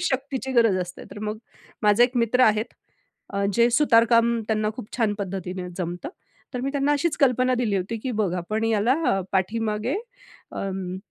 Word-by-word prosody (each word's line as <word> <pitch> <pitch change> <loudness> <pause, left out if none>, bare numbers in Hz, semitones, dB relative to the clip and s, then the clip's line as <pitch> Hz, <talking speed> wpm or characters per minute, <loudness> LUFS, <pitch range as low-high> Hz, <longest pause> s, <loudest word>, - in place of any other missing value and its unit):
शक्तीची 265 -4 -2
गरज 230 -6 +4
असते. 180 0 -7
तर - - -9
मग 215 +1 -4 0.4
माझे 210 +3 +5
एक 250 0 -2
मित्र 235 +2 +2
आहेत, 215 -1 +4 0.9
जे 235 - +5
अ, - - +3
सुतारकाम 235 -3 +4
त्यांना 215 -1 +1
खूप 230 -4 -8
छान 220 -4 +1
पद्धतीने 185 -2 -4
जमतं. 175 -1 -4 0.5
तर 250 - -2
मी 270 +2 -2
त्यांना 280 +1 +1
अशीच 295 +3 0
कल्पना 255 -1 +3
दिली 230 -5 0
होती 190 +5 -2
की 255 +4 -4
बघ, 210 -5 0
आपण 215 +5 -2
ह्याला 225 +2 +2
पाठीमागे 215 - 0 0.6
अं, 190 -2 -4
225 Hz, 160 wpm, -24 LUFS, 200-250 Hz, 0.9 s, माझे